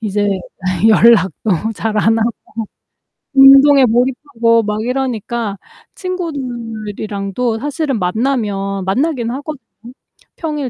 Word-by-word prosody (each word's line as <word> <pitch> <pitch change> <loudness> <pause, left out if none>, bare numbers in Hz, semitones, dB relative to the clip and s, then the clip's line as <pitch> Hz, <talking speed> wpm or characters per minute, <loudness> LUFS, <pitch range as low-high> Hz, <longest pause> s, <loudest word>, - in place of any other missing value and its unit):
이제 205 -1 -1 0.6
연락도 220 -2 +3
잘 215 0 -3
안 225 +2 +2
하고 225 +1 +1 1.1
운동에 275 0 +7
몰입하고 235 -1 +1
막 210 +1 -2
이러니까 235 -4 -3 0.4
친구들이랑도 230 - -4
사실은 285 -3 -2
만나면 195 -2 -1
만나긴 250 +3 -1
하거든요. 285 +2 -6 0.8
평일 300 -5 -3
230 Hz, 235 characters per minute, -16 LUFS, 210-270 Hz, 1.1 s, 운동에